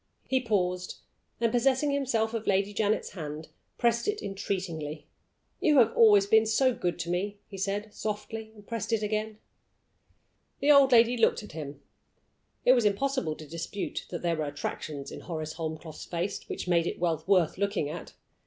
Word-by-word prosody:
He 260 -1 +2
paused, 180 -6 -1 0.4
and 230 -1 +2
possessing 265 +4 +2
himself 240 -5 0
of 225 -1 -4
Lady 200 +1 +2
Janet's 215 +1 0
hand, 155 -3 -7 0.3
pressed 235 0 +1
it 420 0 0
entreatingly. 170 -6 -4 0.5
"You 300 -3 +4
have 230 -3 +5
always 210 -3 +7
been 220 +2 +4
so 255 +4 +3
good 175 -6 -2
to 170 - -3
me," 200 +3 -2
he 195 - -9
said, 205 +2 -2
softly, 220 +1 -5
and 205 -1 -15
pressed 230 -1 -4
it 220 -2 +1
again. 215 0 -2 1.2
The 290 - +4
old 280 -2 +7
lady 235 0 +6
looked 225 -1 +3
at 210 - -10
him. 145 -3 -7 0.8
It 255 - +8
was 245 -3 +3
impossible 210 - 0
to 155 - -11
dispute 170 +5 -5
that 175 - -5
there 170 -1 +1
were 155 - -1
attractions 145 0 -5
in - - -7
Horace 155 -3 -5
Holmcroft's 160 -1 -6
face 175 +3 -4
which - - -4
made 170 -1 +3
it - - -3
well 165 -3 0
worth 185 -3 +3
looking 200 -6 0
at. 165 +4 -7
200 Hz, 170 wpm, -29 LUFS, 170-230 Hz, 1.2 s, It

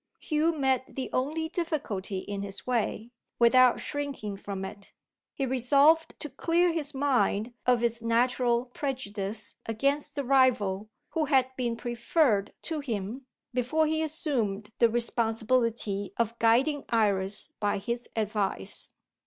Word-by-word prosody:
Hugh 310 +1 +1
met 265 -2 0
the 265 - -4
only 310 +5 0
difficulty 295 - -3
in 200 +1 -4
his 200 0 -5
way, 235 -1 -1 0.3
without 245 +1 +6
shrinking 280 -8 -4
from 195 -1 -5
it. 200 +1 -10 0.4
He 275 - -1
resolved 280 +6 +3
to - - -3
clear 340 +4 +2
his 300 -3 -3
mind 245 -5 +1
of 245 -1 +4
its 235 0 +1
natural 240 +1 +2
prejudice 220 -6 -4
against 275 +8 0
the 285 - -1
rival 240 -7 +2 0.2
who 320 -2 0
had 265 -3 +3
been 240 -2 -1
preferred 240 -1 +1
to 320 -2 -2
him, 240 -1 -4 0.3
before 255 +6 +1
he 315 +1 0
assumed 240 -10 -1
the 235 - +6
responsibility 225 -3 0
of 230 0 -1
guiding 265 +6 +3
Iris 205 +1 +1
by 205 -1 +1
his 235 +4 -4
advice. 210 - -2
240 Hz, 130 wpm, -28 LUFS, 215-280 Hz, 0.4 s, without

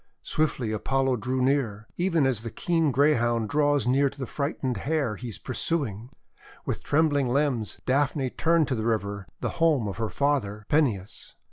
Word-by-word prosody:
Swiftly 135 -7 -1
Apollo 130 +4 0
drew 130 +3 -1
near, 120 -6 0
even 170 -5 +2
as 125 -5 +1
the 115 - -5
keen 165 +4 0
Greyhound 120 -5 +2
draws 145 -1 +2
near 135 +3 +3
to 140 - -15
the 135 - -4
frightened 135 -2 -2
Hare 140 -1 -1
he 125 +5 -7
is 115 - -6
pursuing. 125 -4 -2 0.6
With - - -3
trembling 145 -3 +2
limbs 125 -4 0
Daphne 135 0 +1
turned 165 -2 +2
to 130 - +1
the 110 - -3
river, 100 -3 -2
the - - -1
home 150 -9 +3
of 100 - -5
her 110 -1 -2
father, 120 -8 -1
Peneus. 120 -11 0
130 Hz, 165 wpm, -26 LUFS, 115-145 Hz, 0.6 s, near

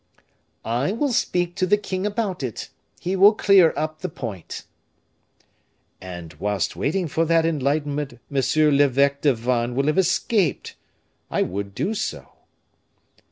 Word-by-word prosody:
"I 120 - 0
will 280 +4 0
speak 175 -7 0
to 185 - +1
the 205 +3 +4
king 195 -1 -3
about 205 -5 -2
it; 125 -5 -5 0.3
he 185 +2 -2
will 200 +3 +6
clear 195 -6 +5
up 155 0 -3
the 185 - -4
point." 110 - -7 1.4
"And 85 -3 -8
whilst 100 -3 -1
waiting 175 +5 -1
for 160 +2 0
that 165 0 +3
enlightenment, 145 -3 -1
Monsieur 150 +2 +2
l'Eveque 140 0 +3
de 140 -4 +3
Vannes 120 +1 -1
will 135 +1 +1
have 155 +5 +2
escaped. 180 - 0 0.5
I - - +1
would 100 +1 -5
do 205 - -1
so." 215 0 -4
150 Hz, 140 wpm, -23 LUFS, 125-185 Hz, 1.4 s, will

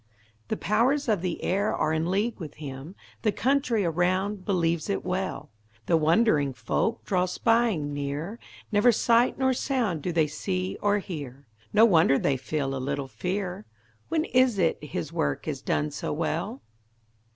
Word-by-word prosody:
The - - -2
powers 250 - +1
of 210 -6 +1
the 180 -2 -3
air 200 +3 +1
are 155 +1 0
in 160 +2 0
league 210 +5 0
with 155 -4 -7
him; 145 +4 -8 0.3
The 215 - +2
country 255 -4 +1
around 185 +4 0
believes 170 -3 0
it 200 - -1
well; 185 -5 -3 0.3
The 170 - +3
wondering 155 - +3
folk 125 - -1
draw 185 -2 +1
spying 210 -7 +1
near; 145 +9 -4 0.3
Never 210 +3 +5
sight 235 +2 +3
nor 260 0 +2
sound 240 - -1
do 175 - -2
they 165 -2 +3
see 185 +5 -3
or 205 0 +3
hear; 145 -8 -7 0.3
No 215 +2 +6
wonder 165 -9 +5
they 140 - +1
feel 135 +1 -2
a 130 - -3
little 140 0 -2
fear; 185 +5 -4 0.4
When 320 -1 +1
is 255 -4 +3
it 165 -4 +1
his 105 - -5
work 70 -1 -1
is - - -3
done 75 0 -1
so - - -4
well? 135 - -2
180 Hz, 160 wpm, -27 LUFS, 150-215 Hz, 0.4 s, No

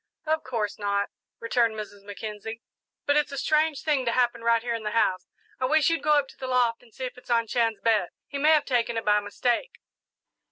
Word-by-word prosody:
"Of 315 0 0
course 220 -6 -3
not," 200 0 0 0.3
returned 230 -1 +1
Mrs. 210 -1 -7
Mackenzie; 210 +2 -7 0.4
"but 285 - +3
it's 300 -1 +2
a 280 - -5
strange 305 0 +1
thing 295 -4 +1
to 235 - +1
happen 240 -1 +1
right 230 0 +3
here 240 -1 -1
in 230 - -3
the 210 - -2
house. 185 -4 +1 0.3
I 255 - +1
wish 310 +4 +3
you'd 330 - 0
go 300 - +3
up 285 -2 +1
to - - -16
the 260 - -4
loft 245 -2 +2
and 245 -2 -21
see 260 - -5
if 250 0 -7
it's - - -22
on 230 -1 +3
Chan's 225 -3 0
bed 215 -5 +2 0.2
he 280 - -5
may 300 +2 +4
have 305 - +3
taken 235 -3 0
it 225 - -3
by 210 0 +4
mistake." 240 - -1
235 Hz, 230 wpm, -26 LUFS, 220-270 Hz, 0.4 s, may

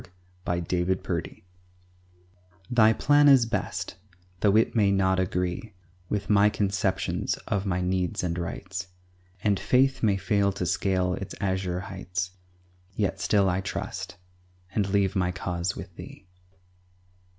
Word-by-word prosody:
GOD'S 85 -1 -1
PLAN 90 +1 0
IS 95 - +4
BEST - - -4 1.3
Thy 110 -2 +6
plan 145 +5 +4
is 135 -4 +7
best, 115 - -3 0.4
though 100 +1 +3
it 115 - +2
may 105 -3 +4
not 95 -1 +2
agree 90 +3 -2 0.3
With 105 -1 -2
my 105 0 +5
conceptions 100 -2 -1
of 100 -1 -1
my 90 -1 0
needs 90 -1 -1
and 85 -2 -1
rights, 95 +2 -5 0.6
And 100 -2 +2
faith 130 +6 +2
may 105 -3 +3
fail 100 +1 +1
to 95 -2 -3
scale 90 +1 +1
its 100 - -6
azure 95 -2 -1
heights; 95 -1 -4 0.6
Yet 100 -3 -1
still 100 0 +3
I 90 +1 +1
trust, 95 - -5 0.6
and 100 -2 0
leave 100 0 +1
my 90 -2 +1
cause 90 +2 -3
with - - -9
Thee. - - -11
95 Hz, 140 wpm, -27 LUFS, 90-105 Hz, 1.3 s, is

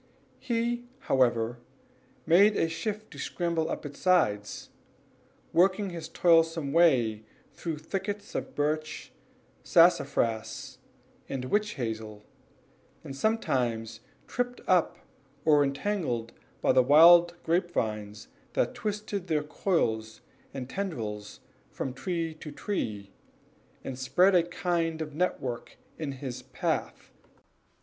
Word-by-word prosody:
He, 240 0 -1
however, 120 - +1 0.7
made 200 +6 +5
shift 210 +6 -4
to - - -10
scramble 170 -2 -1
up - - -4
its 145 -1 -8
sides, 105 - +1 0.8
working 190 +2 +3
his 165 -2 -7
toilsome 165 -4 +3
way 125 -11 +4 0.3
through 165 -3 -4
thickets 200 +6 -5
of - - -4
birch, 155 +1 -2 0.5
sassafras, 110 -1 +2 0.5
and 130 -2 -3
witch 210 +8 0
hazel, 110 -4 -5 0.8
and 135 - -7
sometimes 120 - -1 0.3
tripped 245 0 -3
up 180 -3 +3 0.5
or 150 -2 +5
entangled 140 - -2 0.3
by - - +4
the 130 - +6
wild 170 +6 +7
grapevines 110 - -1 0.3
that - - +1
twisted 210 -2 -4
their 155 -3 +1
coils 110 - -1 0.3
or 135 - -6
tendrils 115 - -5 0.3
from 130 - -4
tree 165 +2 -3
to 150 - -8
tree, 105 - -4 0.7
and 130 -1 -6
spread 160 +10 +4
a 180 - +6
kind 170 -1 -1
of 155 -2 -5
network 140 -7 -3 0.2
in 150 -3 -3
his 130 -2 -6
path. - - -3
155 Hz, 110 wpm, -28 LUFS, 120-180 Hz, 0.8 s, wild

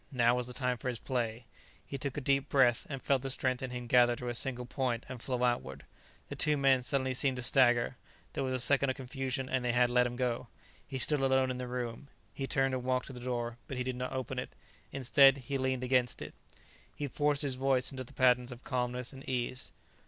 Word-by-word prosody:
Now 120 -3 +3
was 125 -1 -1
the 125 - -6
time 125 -2 -1
for - - -5
his 125 -2 -1
play. 115 -2 -3 0.4
He 140 - -6
took 140 +2 -4
a - - -1
deep 140 +1 +1
breath 125 -4 +3
and 135 -3 -5
felt 135 -2 +2
the 135 - -4
strength 130 -1 0
in 130 - -3
him 125 -1 -5
gather 120 0 +5
to 125 0 -5
a - - -2
single 125 0 -1
point 125 -2 -2
and 125 -2 -8
flow 125 -1 -2
outward. 95 - -1 0.4
The - - -6
two 150 -1 +2
men 135 -2 +4
suddenly 130 +1 0
seemed 130 0 +1
to 125 - -3
stagger; 120 -2 +3 0.4
there - - -2
was 130 -1 -1
a - - 0
second 140 -1 +3
of 130 - -1
confusion 130 -1 -3
and 130 -1 -1
they 120 -1 +1
had 120 0 +3
let 125 0 +4
him 120 - -6
go. 125 -2 -1 0.4
He 135 - -4
stood 150 +3 +3
alone 130 -1 +2
in 125 - -5
the 125 - -4
room. 125 +1 -5 0.3
He 135 - -4
turned 135 -1 +1
and 130 -1 -2
walked 130 0 0
to 140 - -9
the 125 - -8
door, 120 -1 -3
but 130 - -5
he 125 - 0
did 130 0 -3
not 125 0 -4
open 130 0 -3
it. 125 - -5 0.4
Instead, 135 +1 +5
he 135 +1 -4
leaned 130 -1 -1
against 125 -1 +1
it. - - -7 0.6
He 145 - -3
forced 145 +2 +1
his 140 -2 0
voice 130 0 +1
into 130 -1 -5
the 120 - -15
patterns 125 -1 +3
of 125 +1 -10
calmness 125 -1 -2
and 135 0 -10
ease. 125 0 -2
130 Hz, 240 wpm, -32 LUFS, 125-135 Hz, 0.6 s, gather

